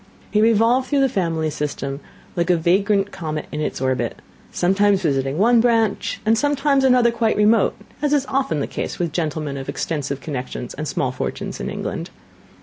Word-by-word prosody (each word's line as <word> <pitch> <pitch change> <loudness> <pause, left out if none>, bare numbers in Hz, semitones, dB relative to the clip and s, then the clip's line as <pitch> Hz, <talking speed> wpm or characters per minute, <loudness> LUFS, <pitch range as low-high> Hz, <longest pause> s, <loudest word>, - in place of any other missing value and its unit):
He 210 - +3
revolved 230 +4 +3
through 285 0 +2
the 270 - +4
family 165 -7 -1
system 140 -2 -4 0.4
like 170 0 0
a 175 - +4
vagrant 195 +4 +2
comet 155 -4 -4
in 150 - -3
its - - -2
orbit; 130 -1 -1 0.3
sometimes 195 +2 +2
visiting 135 -2 0
one 230 +4 +5
branch, 225 -3 +1
and 220 +1 +4
sometimes 280 +1 +2
another 250 -2 +5
quite 230 -1 0
remote; 210 +2 +4 0.3
as 295 -1 +1
is 285 -2 +2
often 260 - 0
the - - 0
case - - -5
with 170 -2 -1
gentlemen 155 -4 -2
of 135 - -6
extensive 145 -4 -3
connections 130 -4 -5
and 150 +2 -5
small 130 -3 -1
fortunes 130 - -4
in - - -3
England. - - -4
190 Hz, 175 wpm, -21 LUFS, 150-230 Hz, 0.4 s, one